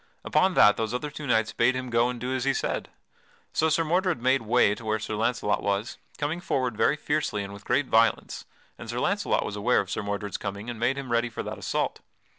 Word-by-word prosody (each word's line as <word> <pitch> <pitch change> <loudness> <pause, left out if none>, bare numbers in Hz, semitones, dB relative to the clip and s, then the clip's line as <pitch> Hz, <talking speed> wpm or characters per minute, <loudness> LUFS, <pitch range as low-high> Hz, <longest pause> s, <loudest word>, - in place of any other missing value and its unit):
Upon 185 -1 +2
that 105 - +6
those 110 +1 -2
other 145 +4 -3
two 150 0 -7
knights 110 -2 +2
bade 120 +2 +3
him 130 -1 -4
go 115 +1 +3
and 125 -1 -5
do 125 +2 -3
as 130 -1 -1
he 135 0 +1
said. - - -2 0.6
So 160 - +2
Sir 160 +2 +2
Mordred 175 0 +1
made 130 +3 +2
way 115 -2 +3
to 115 - -9
where 110 0 0
Sir 110 0 -5
Launcelot 110 -1 0
was, 100 +3 -2 0.2
coming 155 +4 -2
forward 130 -9 -1
very 140 - +3
fiercely 150 -9 -1
and 100 0 -7
with 100 0 -12
great 145 - +2
violence, 115 -2 +1 0.3
and - - -9
Sir - - -2
Launcelot - - +1
was - - -4
aware - - +2
of - - -3
Sir - - -2
Mordred's 100 0 -3
coming 100 +3 -5
and 115 - -8
made 125 +4 +1
him 135 -3 -5
ready 120 +1 +2
for 115 - -5
that - - -6
assault. - - -2
120 Hz, 235 wpm, -26 LUFS, 110-140 Hz, 0.6 s, that